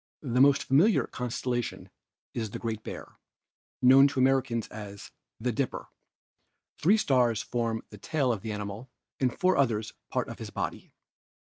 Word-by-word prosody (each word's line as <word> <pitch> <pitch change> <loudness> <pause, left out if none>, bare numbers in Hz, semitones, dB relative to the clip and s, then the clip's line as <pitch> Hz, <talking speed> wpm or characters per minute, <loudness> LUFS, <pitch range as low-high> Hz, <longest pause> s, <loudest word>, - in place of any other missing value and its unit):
The 125 -2 +1
most 140 0 +5
familiar 170 +11 +4
constellation 125 0 -3 0.4
is 110 -3 -3
the - - -6
"Great 110 -2 -4
Bear," - - -9 0.6
known 135 +2 +8
to 140 - -3
Americans 130 -3 +2
as 100 -2 -9 0.3
"the 125 +2 0
Dipper"; 130 +2 -3 0.9
three 195 +8 +5
stars 125 - +2
form 115 -2 -2
the 105 - -11
tail 135 0 0
of 105 - -5
the 110 - -4
animal 105 +4 -6 0.3
and 130 -2 +2
four 185 +7 +2
others 110 -5 +1 0.2
part - - -1
of - - -8
his - - -6
body. - - -5
125 Hz, 150 wpm, -28 LUFS, 110-135 Hz, 0.9 s, known